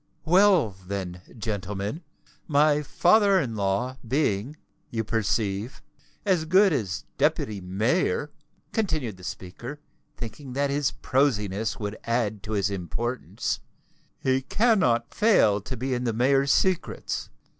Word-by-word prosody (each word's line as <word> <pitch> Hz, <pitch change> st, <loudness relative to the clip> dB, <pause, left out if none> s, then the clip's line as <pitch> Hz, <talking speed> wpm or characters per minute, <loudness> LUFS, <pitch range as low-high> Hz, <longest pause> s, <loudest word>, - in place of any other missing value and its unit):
Well, 180 Hz, -, +5 dB, 0.2 s
then, 90 Hz, -2 st, -4 dB, 0.2 s
gentlemen, 105 Hz, -, -3 dB, 0.5 s
my 150 Hz, 0 st, +4 dB
father 195 Hz, +6 st, +4 dB
in 120 Hz, -9 st, -2 dB
law 105 Hz, +6 st, -1 dB
being, 130 Hz, -1 st, 0 dB, 0.3 s
you 115 Hz, -1 st, -2 dB
perceive, 110 Hz, +1 st, -1 dB, 0.4 s
as 180 Hz, -5 st, +2 dB
good 190 Hz, +2 st, +5 dB
as 105 Hz, -8 st, -2 dB
Deputy 145 Hz, -8 st, +1 dB
Mayor," 115 Hz, -, 0 dB, 0.4 s
continued 155 Hz, -, -1 dB
the 90 Hz, -, -15 dB
speaker, 120 Hz, +11 st, -7 dB, 0.4 s
thinking 125 Hz, +3 st, -7 dB
that 140 Hz, +1 st, 0 dB
his 145 Hz, -1 st, +1 dB
prosiness 110 Hz, -4 st, 0 dB
would 105 Hz, 0 st, -4 dB
add 115 Hz, -3 st, -1 dB
to 110 Hz, +1 st, -5 dB
his 100 Hz, -1 st, +1 dB
importance, 110 Hz, +7 st, -3 dB, 0.6 s
"he 130 Hz, 0 st, +1 dB
cannot 135 Hz, -, +2 dB
fail 110 Hz, -, +4 dB
to 130 Hz, +5 st, -6 dB
be 130 Hz, +3 st, -2 dB
in 125 Hz, 0 st, -1 dB
the 115 Hz, -, 0 dB
mayor's 135 Hz, +4 st, +3 dB
secrets. 185 Hz, -3 st, 0 dB
125 Hz, 125 wpm, -26 LUFS, 105-150 Hz, 0.6 s, Well